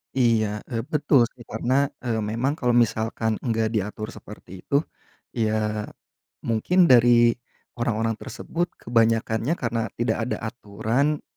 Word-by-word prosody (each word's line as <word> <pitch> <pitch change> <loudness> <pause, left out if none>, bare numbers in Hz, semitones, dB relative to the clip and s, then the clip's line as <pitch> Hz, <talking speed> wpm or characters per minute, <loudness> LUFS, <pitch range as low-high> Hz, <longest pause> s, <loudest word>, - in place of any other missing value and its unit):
Iya 110 -4 +2
e - - -3 0.2
betul 145 -5 +4
sih, 120 - -13
karena 130 +6 0
eee, 115 -3 -2
memang 115 +7 -1
kalau 125 -5 +1
misalkan 110 -1 +1
nggak 115 -2 +1
diatur 105 +1 -2
seperti 95 -5 -11
itu, 140 - +2 0.6
ya, 110 -2 0 0.6
mungkin 115 +11 0
dari 120 -1 +6 0.4
orang-orang 115 -1 -1
tersebut 175 +1 -3 0.2
kebanyakannya 115 +3 +1
karena 115 -6 -2
tidak - - 0
ada - - -2
aturan, 115 +9 -1
115 Hz, 120 wpm, -24 LUFS, 110-125 Hz, 0.6 s, dari